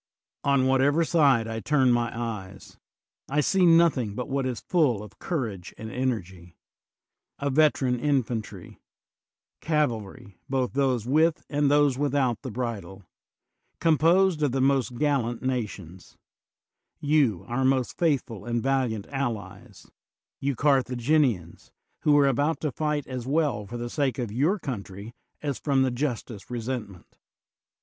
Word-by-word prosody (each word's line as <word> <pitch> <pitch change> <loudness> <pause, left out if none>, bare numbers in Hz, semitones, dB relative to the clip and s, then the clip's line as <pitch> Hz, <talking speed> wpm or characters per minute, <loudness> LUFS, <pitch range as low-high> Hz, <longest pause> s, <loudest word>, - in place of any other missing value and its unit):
On 140 -2 +3
whatever 135 +5 +3
side 140 -9 +3
I 115 0 -4
turn 130 0 +2
my 120 -1 +1
eyes 100 -5 -6 0.5
I 145 +2 +1
see 180 +4 +3
nothing 165 -11 +4
but 125 - -4
what 135 -1 -1
is 125 -3 -3
full 140 - +1
of 105 - -14
courage 110 - -4
and 110 0 -7
energy: 95 -9 -4 0.8
a 140 0 -2
veteran 130 -4 +2
infantry; 125 -6 -2 0.8
cavalry, 120 - -2
both 130 -2 -1
those 130 -5 +1
with 155 +5 +2
and 145 -1 +2
those 145 -2 +3
without 140 -4 0
the 130 - -6
bridle, 105 -5 -5 0.8
composed 165 +2 +3
of 145 -4 +1
the 135 - 0
most 135 -2 +1
gallant 135 -5 0
nations, 105 -9 -5 0.4
— - - -38
^you, 110 - +2
our 120 +3 -1
most 130 -1 +1
faithful 130 - -1
and 120 -1 -1
valiant 130 -6 0
allies, 115 -9 -5 0.5
you 140 0 -1
Carthaginians, 125 - +1 0.3
who 145 -1 +4
are 145 - +5
about 145 +5 +1
to 150 - -1
fight 150 0 -2
as 125 -2 -6
well 140 -8 0
for 120 +4 -6
the 120 0 -4
sake 135 -1 -1
of 120 -5 -3
your 150 - +1
country 105 - -7 0.3
as 140 -3 -2
from 135 -3 +2
the 130 - +1
justest 120 -5 -4
resentment. 115 -6 -6
130 Hz, 140 wpm, -26 LUFS, 115-145 Hz, 0.8 s, are